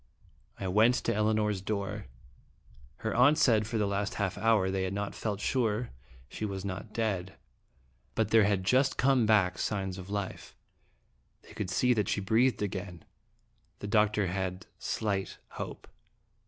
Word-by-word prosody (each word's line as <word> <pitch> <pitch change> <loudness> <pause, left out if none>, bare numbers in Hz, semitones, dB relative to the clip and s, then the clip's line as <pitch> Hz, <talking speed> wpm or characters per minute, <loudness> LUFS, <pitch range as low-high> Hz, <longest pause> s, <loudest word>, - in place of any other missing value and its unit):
I 95 - -3
went 110 +6 +4
to - - 0
Elinor's 105 -2 +1
door. 100 0 -3 1.0
Her 110 - 0
aunt 130 +6 +5
said 110 -4 +3
for 115 - -2
the 105 - +2
last 100 0 -2
half 100 -3 -1
hour 105 -3 +2
they 95 0 -1
had 95 +1 -2
not 100 0 -3
felt 105 -3 -3
sure 115 -1 0 0.4
she - - -7
was 100 -2 -3
not 100 +3 -5
dead, 95 -5 -2 0.8
but 110 -2 0
there 110 -2 +6
had 100 -2 +1
just 130 +7 +2
come 130 -4 +3
back 100 -4 +3
signs 95 -3 -2
of 95 +1 -9
life; 100 -2 -5 0.9
they - - -15
could 100 - -4
see 125 +7 +3
that 105 -4 0
she - - 0
breathed 110 +3 +2
again. 95 -3 -5 0.7
The - - -8
doctor 105 -1 +2
had 95 0 -3
slight 100 -3 -2
hope. - - -7
105 Hz, 155 wpm, -30 LUFS, 95-110 Hz, 1.0 s, there